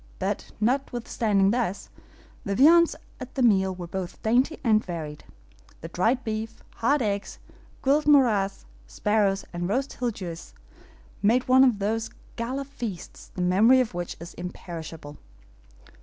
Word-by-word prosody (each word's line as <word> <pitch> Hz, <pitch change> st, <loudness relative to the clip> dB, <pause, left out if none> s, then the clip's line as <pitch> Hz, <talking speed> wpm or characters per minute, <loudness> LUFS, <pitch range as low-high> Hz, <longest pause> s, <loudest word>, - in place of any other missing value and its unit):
But -, -, -3 dB
notwithstanding 225 Hz, -4 st, +1 dB
this, 225 Hz, -5 st, -2 dB, 0.5 s
the 200 Hz, -, -2 dB
viands 335 Hz, +7 st, +6 dB, 0.2 s
at 255 Hz, 0 st, -9 dB
the 265 Hz, -, +1 dB
meal 190 Hz, -5 st, +3 dB
were 180 Hz, -1 st, -6 dB
both 180 Hz, +1 st, -6 dB
dainty 250 Hz, +8 st, +2 dB
and 220 Hz, -3 st, +3 dB
varied. 155 Hz, -4 st, -6 dB, 0.6 s
The 165 Hz, -, -7 dB
dried 225 Hz, +10 st, +1 dB
beef, 220 Hz, 0 st, -5 dB
hard 275 Hz, +3 st, +2 dB
eggs, 200 Hz, -1 st, -3 dB, 0.5 s
grilled 290 Hz, +3 st, +2 dB
MOJARRAS, 225 Hz, -, +3 dB, 0.2 s
sparrows, 205 Hz, -, 0 dB
and 175 Hz, +1 st, -3 dB
roast 265 Hz, +6 st, -1 dB
HILGUEROS, 190 Hz, -9 st, -5 dB, 0.7 s
made 235 Hz, +5 st, +2 dB
one 260 Hz, +1 st, +6 dB
of 250 Hz, -5 st, +4 dB
those 220 Hz, +3 st, -1 dB, 0.3 s
gala 255 Hz, +4 st, -3 dB
feasts 235 Hz, -9 st, -7 dB
the 180 Hz, -, -3 dB
memory 215 Hz, +9 st, +5 dB
of 250 Hz, -6 st, 0 dB
which 175 Hz, 0 st, -5 dB
is 170 Hz, +1 st, -9 dB
imperishable. 165 Hz, -4 st, -8 dB
215 Hz, 135 wpm, -26 LUFS, 185-255 Hz, 0.7 s, viands